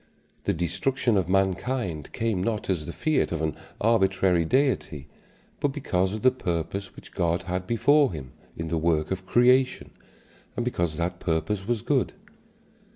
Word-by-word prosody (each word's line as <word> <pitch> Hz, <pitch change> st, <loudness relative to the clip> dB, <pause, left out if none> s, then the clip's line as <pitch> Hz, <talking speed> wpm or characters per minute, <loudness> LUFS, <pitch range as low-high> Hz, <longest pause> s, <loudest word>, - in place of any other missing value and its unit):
The -, -, +2 dB
destruction 95 Hz, +8 st, 0 dB
of 95 Hz, -3 st, +1 dB
mankind 95 Hz, -, 0 dB
came 110 Hz, -5 st, -1 dB
not 105 Hz, 0 st, -1 dB
as 80 Hz, -5 st, -2 dB
the -, -, -3 dB
fiat 155 Hz, -, 0 dB
of 85 Hz, -, -1 dB
an 80 Hz, -2 st, -1 dB, 0.2 s
arbitrary 95 Hz, -6 st, +3 dB
Deity, 85 Hz, -, 0 dB, 0.5 s
but -, -, +2 dB
because 105 Hz, -10 st, -1 dB
of 110 Hz, +2 st, -5 dB
the 130 Hz, -, +6 dB
purpose 95 Hz, -3 st, -3 dB
which -, -, -13 dB
God 85 Hz, 0 st, 0 dB
had 90 Hz, 0 st, -3 dB
before 140 Hz, +4 st, +4 dB
him 70 Hz, -7 st, -7 dB, 0.3 s
in 80 Hz, -1 st, -4 dB
the 85 Hz, 0 st, 0 dB
work 80 Hz, 0 st, +1 dB
of 95 Hz, 0 st, -3 dB
creation, 125 Hz, +2 st, +3 dB, 0.6 s
and 120 Hz, -, -2 dB
because 85 Hz, -10 st, -1 dB
that 85 Hz, +1 st, -2 dB
purpose 95 Hz, +5 st, -1 dB
was 120 Hz, -3 st, -1 dB
good. -, -, +1 dB
95 Hz, 155 wpm, -26 LUFS, 85-120 Hz, 0.6 s, the